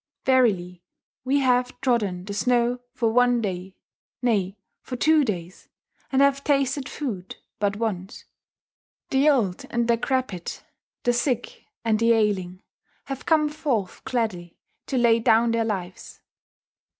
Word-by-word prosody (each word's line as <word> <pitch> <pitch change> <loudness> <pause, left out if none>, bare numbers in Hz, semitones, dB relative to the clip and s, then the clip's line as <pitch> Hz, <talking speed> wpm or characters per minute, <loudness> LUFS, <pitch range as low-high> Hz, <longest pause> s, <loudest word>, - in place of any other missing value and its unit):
Verily 195 -9 +2 0.4
we 275 +2 +2
have 250 -1 +1
trodden 205 -9 0
the 200 - -5
snow 245 +3 +1 0.2
for 230 -3 +1
one 245 0 +4
day, 190 -3 -4 0.5
nay, 205 -5 +1 0.2
for 255 - -6
two 310 +4 +4
days, 185 -6 -5 0.4
and 270 0 +4
have 280 0 +2
tasted 275 -1 +1
food 200 -11 -5 0.2
but 205 -1 0
once. 205 -3 -4 0.9
The 275 +2 +4
old 215 -11 +1
and 235 0 0
decrepit, 235 -5 -1 0.4
the 245 - +2
sick 255 - -2 0.2
and 220 -1 +2
the 230 0 +4
ailing, 195 -4 0 0.4
have 270 -1 -7
come 310 -2 +4
forth 280 - -2
gladly 205 -9 -3 0.3
to 265 - -1
lay 235 -2 +4
down 230 0 +3
their 230 0 +1
lives. 190 -4 -5
235 Hz, 130 wpm, -24 LUFS, 200-260 Hz, 0.9 s, one